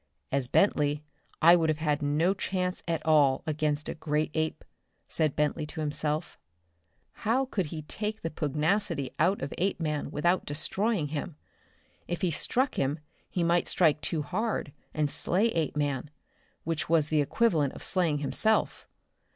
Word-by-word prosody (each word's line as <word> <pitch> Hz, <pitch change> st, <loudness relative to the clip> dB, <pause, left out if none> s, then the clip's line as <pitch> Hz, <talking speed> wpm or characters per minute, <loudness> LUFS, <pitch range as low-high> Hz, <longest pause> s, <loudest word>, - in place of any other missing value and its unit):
"As 135 Hz, -2 st, +1 dB
Bentley 150 Hz, -3 st, +2 dB, 0.4 s
I 170 Hz, +2 st, +9 dB
would 165 Hz, -2 st, +2 dB
have 150 Hz, -1 st, 0 dB
no 150 Hz, +6 st, +2 dB
chance 185 Hz, -2 st, -2 dB
at 165 Hz, -2 st, -1 dB
all 145 Hz, -4 st, +4 dB
against 150 Hz, -1 st, -1 dB
a -, -, -2 dB
great 155 Hz, 0 st, -1 dB
ape," 160 Hz, 0 st, -2 dB, 0.4 s
said 155 Hz, -3 st, 0 dB
Bentley 150 Hz, 0 st, 0 dB
to 160 Hz, -, -8 dB
himself. 150 Hz, +1 st, -1 dB, 0.8 s
How 240 Hz, +5 st, +2 dB
could 195 Hz, -, -2 dB
he 155 Hz, 0 st, -6 dB
take 210 Hz, +7 st, -4 dB
the 165 Hz, -, -2 dB
pugnacity 155 Hz, 0 st, 0 dB
out 185 Hz, +6 st, +2 dB
of 140 Hz, -, -4 dB
Apeman 165 Hz, -5 st, -1 dB
without 175 Hz, +5 st, +1 dB
destroying 165 Hz, +3 st, -1 dB
him? 155 Hz, +2 st, -4 dB, 0.7 s
If 175 Hz, +2 st, -4 dB
he 180 Hz, -, +2 dB
struck 255 Hz, -, 0 dB
him 140 Hz, +3 st, 0 dB, 0.3 s
he 175 Hz, -, -1 dB
might 170 Hz, +1 st, +2 dB
strike 155 Hz, -4 st, +3 dB
too 155 Hz, -3 st, -1 dB
hard 185 Hz, -2 st, -2 dB, 0.2 s
and 155 Hz, -1 st, 0 dB
slay 190 Hz, +9 st, +1 dB
Apeman 145 Hz, -, -1 dB, 0.5 s
which 165 Hz, 0 st, -2 dB
was 160 Hz, -3 st, +3 dB
the 155 Hz, -1 st, +3 dB
equivalent 155 Hz, -, +1 dB
of -, -, -8 dB
slaying 170 Hz, -6 st, +1 dB
himself. 220 Hz, +9 st, +1 dB
155 Hz, 150 wpm, -29 LUFS, 150-180 Hz, 0.8 s, I